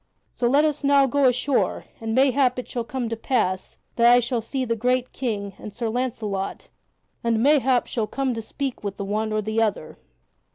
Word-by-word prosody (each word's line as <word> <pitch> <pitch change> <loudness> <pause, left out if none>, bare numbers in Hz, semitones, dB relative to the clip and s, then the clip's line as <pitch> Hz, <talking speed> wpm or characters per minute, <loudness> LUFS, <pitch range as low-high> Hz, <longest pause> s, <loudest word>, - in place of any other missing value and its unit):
So 240 - 0
let 285 +5 +4
us 300 -1 -1
now 280 -1 +5
go 275 +2 +2
ashore, 255 +2 +1
and 225 0 -3
mayhap 260 -1 +3
it 250 - -5
shall 240 - -3
come 245 +1 -3
to 230 - -2
pass 220 -6 -1 0.2
that 235 0 +6
I 245 - +7
shall 240 -1 -1
see 260 +3 -3
the 230 -1 0
great 250 +2 0
King 205 -6 -3
and 210 -1 -9
Sir 230 -1 -2
Launcelot 220 -5 -3 0.5
and 230 -1 +1
mayhap 265 -3 +4
shall 225 -4 -2
come 270 +1 -1
to 225 - -4
speak 265 +3 -5
with 200 -1 -4
the 200 - -4
one 215 +2 -1
or 215 0 0
the 220 +2 0
other." 205 -8 -2
240 Hz, 200 wpm, -24 LUFS, 220-260 Hz, 0.5 s, I